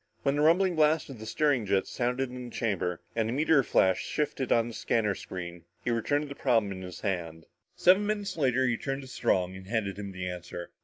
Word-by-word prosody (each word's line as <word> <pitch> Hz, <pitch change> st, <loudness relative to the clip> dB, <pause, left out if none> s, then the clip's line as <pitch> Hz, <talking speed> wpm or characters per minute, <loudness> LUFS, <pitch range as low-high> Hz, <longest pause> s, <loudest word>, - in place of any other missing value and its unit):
When 140 Hz, -, +2 dB
the 145 Hz, -, +1 dB
rumbling 175 Hz, +4 st, +4 dB
blast 155 Hz, -1 st, +3 dB
of 125 Hz, -, -10 dB
the 110 Hz, -, -8 dB
steering 145 Hz, -2 st, +2 dB
jets 95 Hz, 0 st, +1 dB
sounded 125 Hz, +1 st, -1 dB
in 125 Hz, 0 st, -7 dB
the 120 Hz, -, -10 dB
chamber 90 Hz, -6 st, -1 dB
and 110 Hz, -1 st, +1 dB
the -, -, -1 dB
meteor 150 Hz, +1 st, +4 dB
flash 95 Hz, -6 st, +2 dB
shifted 145 Hz, -3 st, -2 dB
on 115 Hz, 0 st, +4 dB
the 120 Hz, -, -7 dB
scanner 110 Hz, -2 st, +1 dB
screen, 85 Hz, -3 st, -7 dB, 0.2 s
he 120 Hz, -, 0 dB
returned 145 Hz, +6 st, +1 dB
to -, -, -6 dB
the -, -, -5 dB
problem 115 Hz, -7 st, +1 dB
in 95 Hz, -1 st, -6 dB
his 90 Hz, -1 st, -8 dB
hand. 85 Hz, -5 st, -3 dB, 0.3 s
Seven 190 Hz, +3 st, +5 dB
minutes 205 Hz, -1 st, -2 dB
later 130 Hz, -4 st, +2 dB
he 120 Hz, -2 st, +1 dB
turned 135 Hz, +2 st, -3 dB
to -, -, -10 dB
Strong 95 Hz, -7 st, 0 dB
and 95 Hz, 0 st, -10 dB
handed 105 Hz, -3 st, -2 dB
him 100 Hz, -1 st, -5 dB
the 95 Hz, -1 st, -5 dB
answer. 90 Hz, -1 st, -6 dB
115 Hz, 225 wpm, -29 LUFS, 95-140 Hz, 0.3 s, Seven